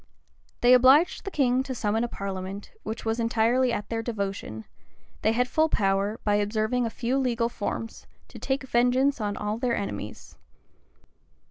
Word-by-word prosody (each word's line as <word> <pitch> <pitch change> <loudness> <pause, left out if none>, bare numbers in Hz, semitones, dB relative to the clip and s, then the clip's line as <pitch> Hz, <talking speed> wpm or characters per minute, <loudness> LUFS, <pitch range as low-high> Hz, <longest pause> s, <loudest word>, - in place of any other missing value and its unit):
They 245 +1 +6
obliged 265 +10 +5
the - - -2
king 260 -7 +2
to 265 -1 -5
summon 220 0 0
a - - 0
parliament, 195 -1 -6
which 220 +2 -6
was 225 +1 -1
entirely 235 +2 +2
at 205 -3 -3
their 225 -1 -2
devotion, 200 - -4 0.6
they 220 - +3
had 250 +2 +1
full 315 +5 +2
power, 200 -1 0
by 205 -1 +2
observing 220 +4 0
a - - -2
few 255 +3 -1
legal 235 -3 0
forms, 225 0 -5 0.2
to - - -11
take 265 +1 -2
vengeance 255 +1 +2
on 205 -1 -2
all 210 +2 -3
their 245 -1 0
enemies. 200 - -6
230 Hz, 160 wpm, -26 LUFS, 210-250 Hz, 0.6 s, They